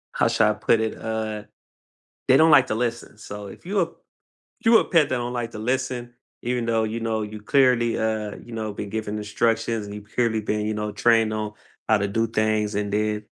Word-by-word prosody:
How - - +2
should 110 - +3
I 105 - +3
put 105 +2 +2
it? 110 -1 -2
Uh, 110 -1 -3 0.8
they 130 - +6
don't 160 +2 +6
like 135 -4 +7
to - - -1
listen. 120 -2 -3
So 105 -1 -8
if 100 - -13
you 195 +2 +1
a 170 - +1 0.8
you 225 0 +7
a - - +2
pet 160 -5 +3
that 130 - 0
don't 120 0 -3
like 120 -2 -3
to - - -7
listen, 125 +1 -2 0.3
even 120 -1 -1
though, 115 -1 +1
you 110 +2 -3
know, 110 -1 -1
you 105 0 -7
clearly, 125 -1 +3
uh, 110 -2 -2
you 120 - -12
know, 110 -2 -3
been 100 0 -6
giving 110 -1 -3
instructions 110 +1 0
and 100 - -8
you've 105 0 -11
clearly 115 -3 +1
been, 105 0 -2
you 110 - -1
know, 105 0 -3
trained 115 -1 +3
on 110 -1 -3 0.4
how 110 - +5
to 100 0 -1
do 115 +3 0
things, 110 -1 0
and 100 0 -2
then, 105 0 0
110 Hz, 220 wpm, -24 LUFS, 105-120 Hz, 0.8 s, like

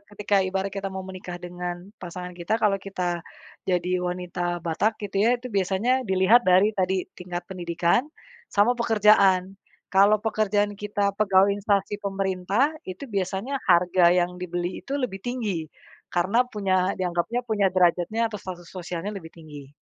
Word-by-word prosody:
ketika 205 0 0
ibarat 190 +1 -2
kita 195 0 -4
mau 190 0 -6
menikah 185 -1 -7
dengan 175 0 -5 0.2
pasangan 180 0 -7
kita, 175 +5 -2
kalau 205 -3 +1
kita, 180 -3 -3 0.5
jadi 180 0 0 0.2
wanita 175 -1 -3
Batak, 205 +7 0
gitu, 195 -1 -2
ya, 235 +4 +4
itu 245 0 -9
biasanya 200 +7 +1
dilihat 190 +4 +4
dari, 190 +4 +5
tadi, 190 -2 0
tingkat 180 -1 -6
pendidikan, 175 - 0 0.4
sama 205 +4 +3
pekerjaan. 205 -5 +3 0.4
Kalau 205 +2 +6
pekerjaan 210 -2 0
kita 205 -1 -1
pegawai 200 -1 +4
instansi 205 0 0
pemerintah, 195 - 0 0.2
itu 185 +10 -7
biasanya 200 +5 -2
harga 175 -1 +4
yang 180 0 +1
dibeli 175 0 -4
itu 280 +1 -3
lebih 195 -7 -4
tinggi, 210 - -3 0.4
karena 195 +8 +2
punya, 195 -5 0
dianggapnya 180 +6 -1
punya 200 -4 +2
derajatnya 185 +5 +2
atau 215 - -7
status 180 -3 -8
sosialnya 180 +2 -5
lebih 165 -4 -8
tinggi. 145 -4 -12
190 Hz, 145 wpm, -25 LUFS, 180-210 Hz, 0.5 s, Kalau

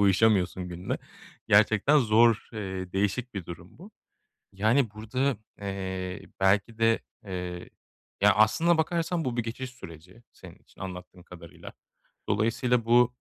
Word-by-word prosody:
uyuşamıyorsun 95 -2 +2
günle. 90 +2 -4 0.5
Gerçekten 110 +8 +5
zor, 115 -1 +3
eee, 95 -4 -5
değişik 105 +5 -1
bir 95 -4 -5
durum 85 +7 -11
bu. 195 +5 -12 0.6
Yani, 110 +4 +2
burada, 120 +5 -2 0.2
eee, 95 -2 -5
belki 100 +4 +2
de, 115 0 +3 0.3
eee 90 -1 -6 0.5
Ya, 105 0 +6
aslına 160 - +3
bakarsan 170 +1 0
bu 125 -2 -2
bir 120 - +1
geçiş 125 +3 -6
süreci 90 -2 -13
senin - - -13
için - - -24
anlattığın 90 -1 -8
kadarıyla. 85 -2 -12 0.6
Dolayısıyla 115 +3 +1
bu, 120 +1 +4
105 Hz, 125 wpm, -27 LUFS, 95-120 Hz, 0.6 s, Ya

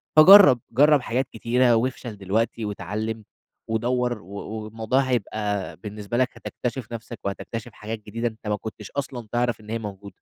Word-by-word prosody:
فجرّب 180 -5 +10
جرّب 145 +3 +5
حاجات 125 +2 -1
كتيرة 120 +2 +3
وافشل 120 -2 -2
دلوقتي 110 +3 -1
واتعلم 110 +2 -4 0.4
ودوّر 120 +1 0
و - - -17
و 110 +1 -5
والموضوع 110 +4 0
هيبقى 105 -6 -2
بالنسبة 105 +1 -5
لك 130 0 +3
هتكتشف 125 -1 -5
نفسك، 115 -3 -7
وهتكتشف 115 +4 -5
حاجات 110 +1 -6
جديدة، 115 +3 -2
أنت 110 -1 -8
ما 105 - +1
كنتش 105 0 -8
أصلًا 130 -5 -4
تعرف 120 -2 0
إن 105 - -14
هي 115 +1 -2
موجودة. 100 -2 -7
115 Hz, 160 wpm, -24 LUFS, 105-125 Hz, 0.4 s, فجرّب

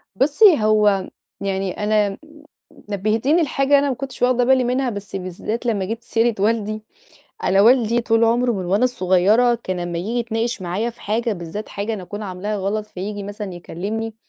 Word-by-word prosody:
بُصّي، 295 - +5
هو 210 -3 +3 0.3
يعني 195 -1 -1
أنا 210 -2 +1 0.7
نبهتيني 220 - +1
لحاجة 280 0 +3
أنا 285 0 0
ما 260 - -1
كنتش 270 +1 -7
واخدة 250 0 +3
بالي 260 0 +4
منها، 250 +1 0
بس 200 -3 -7
بالذات 195 +5 -4
لما 210 -5 0
جيبتِ 225 +4 -5
سيرة 230 -1 +1
والدي، 215 0 0 0.6
أنا 195 +1 +3
والدي 235 +1 +4
طول 225 0 +2
عمره 240 +2 +2
من 190 -4 -3
وأنا 200 +8 +2
صغيرة 210 +3 +3
كان 185 -1 -3
لما 175 -1 -3
ييجي 220 +8 -2
يتناقش 230 -2 -2
معايا 190 +7 -2
في 235 - -20
حاجة 225 +2 -1
بالذات 180 +3 -6
حاجة 205 +3 -3
أنا 200 - -7
أكون 205 +4 -7
عاملها 205 +2 -4
غلط، 205 +2 -2
فييجي 205 +2 -6
مثلًا 205 -1 -6
يكلمني، 210 +6 -5
215 Hz, 170 wpm, -21 LUFS, 195-240 Hz, 0.7 s, بُصّي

